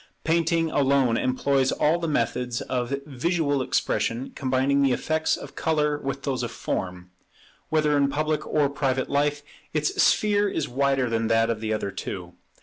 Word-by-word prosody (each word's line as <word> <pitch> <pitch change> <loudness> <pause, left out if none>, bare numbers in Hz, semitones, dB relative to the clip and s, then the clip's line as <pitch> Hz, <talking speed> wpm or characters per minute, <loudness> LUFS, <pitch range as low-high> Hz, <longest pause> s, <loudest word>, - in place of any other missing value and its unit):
Painting 165 0 +1
alone 135 -4 +3
employs 130 +2 +1
all 160 +3 +2
the 170 - -2
methods 125 -3 -1
of 125 +1 -2
visual 145 0 0
expression, 125 0 -1
combining 135 +1 +1
the 135 -2 +3
effects 160 +4 0
of - - -10
colour 150 -2 0
with 135 -1 -4
those 135 -3 -1
of 120 - -2
form. 90 -5 -4 0.6
Whether 150 -1 +2
in 140 -1 +3
public 155 +2 -1
or 150 -2 +2
private 135 -2 -1
life, 145 +1 +1 0.3
its 150 0 +1
sphere 205 -1 +3
is 160 -6 -2
wider 135 0 +1
than 115 -1 0
that 115 0 +3
of 110 -1 -4
the 110 -1 -2
other 105 -2 -2
two. 90 -3 -6
140 Hz, 160 wpm, -25 LUFS, 125-150 Hz, 0.6 s, alone